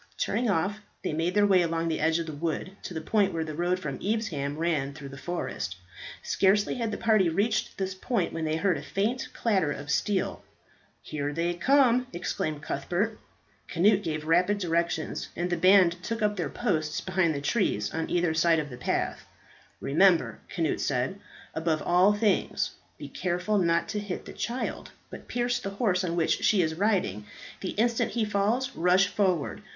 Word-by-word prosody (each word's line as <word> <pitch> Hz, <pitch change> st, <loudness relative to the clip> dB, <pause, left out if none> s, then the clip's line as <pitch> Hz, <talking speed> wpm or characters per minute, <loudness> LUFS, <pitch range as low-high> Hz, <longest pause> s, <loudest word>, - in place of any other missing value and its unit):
Turning 240 Hz, -1 st, 0 dB
off, 195 Hz, +3 st, 0 dB, 0.2 s
they -, -, -2 dB
made 165 Hz, +4 st, -1 dB
their 205 Hz, 0 st, +5 dB
way 190 Hz, -3 st, +5 dB
along 165 Hz, -1 st, 0 dB
the 160 Hz, -, -1 dB
edge 160 Hz, +1 st, +2 dB
of 170 Hz, -, -2 dB
the 160 Hz, -, -5 dB
wood 160 Hz, +4 st, -3 dB
to -, -, -7 dB
the 165 Hz, -, -3 dB
point 200 Hz, +3 st, +2 dB
where 165 Hz, -2 st, -2 dB
the 155 Hz, -1 st, -6 dB
road 175 Hz, +3 st, 0 dB
from 150 Hz, -8 st, -5 dB
Evesham 185 Hz, -10 st, -1 dB
ran 155 Hz, -4 st, 0 dB
through 140 Hz, -1 st, -9 dB
the 135 Hz, -, -9 dB
forest. 135 Hz, -, -4 dB, 0.5 s
Scarcely 200 Hz, +2 st, +2 dB
had 230 Hz, -3 st, -2 dB
the 215 Hz, -, -3 dB
party 215 Hz, -6 st, +3 dB
reached 210 Hz, +6 st, 0 dB
this 190 Hz, -1 st, -2 dB
point 195 Hz, 0 st, -1 dB
when 165 Hz, -, -3 dB
they 155 Hz, 0 st, 0 dB
heard 180 Hz, +1 st, +1 dB
a -, -, -8 dB
faint 220 Hz, +6 st, -1 dB
clatter 190 Hz, -10 st, +1 dB
of 145 Hz, +1 st, -5 dB
steel. 195 Hz, +5 st, 0 dB, 0.6 s
"Here 145 Hz, -1 st, -3 dB
they 170 Hz, +3 st, -1 dB
come!" 250 Hz, +5 st, +3 dB
exclaimed 155 Hz, -3 st, -3 dB
Cuthbert. 190 Hz, +11 st, -2 dB, 0.5 s
Cnut 195 Hz, +4 st, +4 dB
gave 155 Hz, -5 st, -3 dB
rapid 180 Hz, +5 st, +3 dB
directions, 170 Hz, -3 st, -1 dB
and 175 Hz, +1 st, -2 dB
the -, -, +2 dB
band 180 Hz, 0 st, +5 dB
took 230 Hz, +4 st, -3 dB
up 210 Hz, 0 st, +2 dB
their 175 Hz, -7 st, -2 dB
posts 155 Hz, +1 st, -1 dB
behind 185 Hz, -4 st, +1 dB
the -, -, -2 dB
trees, 140 Hz, -, 0 dB
on 160 Hz, 0 st, -2 dB
either 175 Hz, -2 st, +1 dB
side 165 Hz, +1 st, +3 dB
of 150 Hz, -3 st, -3 dB
the 125 Hz, -, -8 dB
path. -, -, -2 dB, 0.5 s
"Remember," 170 Hz, +4 st, +3 dB, 0.2 s
Cnut 165 Hz, -4 st, 0 dB
said, 135 Hz, +8 st, -1 dB, 0.3 s
"above 160 Hz, -1 st, -1 dB
all 180 Hz, +3 st, +5 dB
things 205 Hz, -1 st, +1 dB, 0.3 s
be -, -, -8 dB
careful 180 Hz, +3 st, -1 dB
not 170 Hz, -2 st, +2 dB
to 210 Hz, -, -2 dB
hit 205 Hz, -3 st, -5 dB
the -, -, -9 dB
child, 245 Hz, +2 st, -4 dB, 0.2 s
but -, -, -10 dB
pierce 245 Hz, 0 st, 0 dB
the 195 Hz, -, -4 dB
horse 190 Hz, -6 st, +1 dB
on 170 Hz, -2 st, -1 dB
which 165 Hz, -2 st, +1 dB
she 195 Hz, -4 st, +4 dB
is 160 Hz, -1 st, -1 dB
riding. 170 Hz, -, 0 dB, 0.3 s
The 185 Hz, -, -4 dB
instant 235 Hz, +1 st, +1 dB
he 230 Hz, -2 st, +1 dB
falls, 215 Hz, +6 st, 0 dB
rush 180 Hz, +3 st, +4 dB
forward. 185 Hz, -6 st, 0 dB
180 Hz, 185 wpm, -28 LUFS, 160-205 Hz, 0.6 s, their